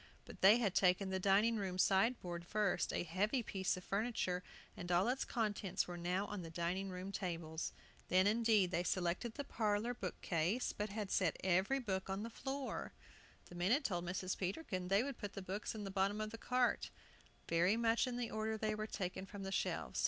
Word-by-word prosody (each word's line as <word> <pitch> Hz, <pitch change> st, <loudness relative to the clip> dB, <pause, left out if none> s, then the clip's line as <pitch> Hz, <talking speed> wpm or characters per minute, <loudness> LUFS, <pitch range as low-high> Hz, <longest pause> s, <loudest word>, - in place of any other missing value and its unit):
But -, -, -12 dB
they 200 Hz, +4 st, +8 dB
had 210 Hz, -6 st, +1 dB
taken 190 Hz, +1 st, +3 dB
the 190 Hz, -, 0 dB
dining 205 Hz, +4 st, +4 dB
room 190 Hz, -3 st, -2 dB
sideboard 190 Hz, -3 st, +2 dB
first, 205 Hz, +1 st, 0 dB
a -, -, -1 dB
heavy 205 Hz, -, 0 dB
piece 190 Hz, -3 st, -1 dB
of 180 Hz, -, -8 dB
furniture, 200 Hz, -3 st, -1 dB, 0.3 s
and 175 Hz, 0 st, -5 dB
all 175 Hz, +4 st, +4 dB
its 260 Hz, +2 st, +1 dB
contents 210 Hz, -4 st, -1 dB
were 175 Hz, -, -5 dB
now 180 Hz, +3 st, -1 dB
on 205 Hz, -2 st, -5 dB
the 165 Hz, -, -7 dB
dining 175 Hz, +4 st, -2 dB
room 185 Hz, +1 st, -5 dB
tables. 165 Hz, -4 st, -3 dB, 0.4 s
Then, 185 Hz, +1 st, +5 dB
indeed, 215 Hz, -3 st, +4 dB
they 175 Hz, -, +1 dB
selected 180 Hz, +6 st, -1 dB
the 285 Hz, -, -3 dB
parlor 220 Hz, -1 st, 0 dB
book 195 Hz, -7 st, -5 dB
case, 175 Hz, +9 st, 0 dB
but 210 Hz, +1 st, -3 dB
had 205 Hz, -1 st, -4 dB
set 180 Hz, -5 st, +2 dB
every 190 Hz, +8 st, +3 dB
book 195 Hz, -7 st, -2 dB
on 195 Hz, +2 st, -2 dB
the 230 Hz, -, -5 dB
floor 270 Hz, +3 st, -4 dB, 0.5 s
The -, -, -13 dB
men 175 Hz, +3 st, 0 dB
had 280 Hz, +3 st, +3 dB
told 175 Hz, -4 st, 0 dB
Mrs. 185 Hz, +1 st, -2 dB
Peterkin 185 Hz, -, -2 dB
they 195 Hz, +4 st, +4 dB
would 275 Hz, -2 st, -5 dB
put 205 Hz, -2 st, -5 dB
the 195 Hz, -, -5 dB
books 200 Hz, +4 st, -3 dB
in 215 Hz, -, -5 dB
the 195 Hz, -, -4 dB
bottom 195 Hz, +2 st, +1 dB
of 215 Hz, 0 st, -3 dB
the 225 Hz, -, -7 dB
cart, 250 Hz, 0 st, +1 dB, 0.6 s
very 180 Hz, +6 st, +3 dB
much 230 Hz, +2 st, +3 dB
in 245 Hz, -1 st, -3 dB
the 240 Hz, -2 st, -2 dB
order 220 Hz, 0 st, -1 dB
they 215 Hz, 0 st, 0 dB
were 215 Hz, 0 st, -3 dB
taken 190 Hz, -1 st, -4 dB
from 200 Hz, -1 st, -7 dB
the 195 Hz, -, -4 dB
shelves. -, -, -1 dB
195 Hz, 205 wpm, -38 LUFS, 180-220 Hz, 0.6 s, they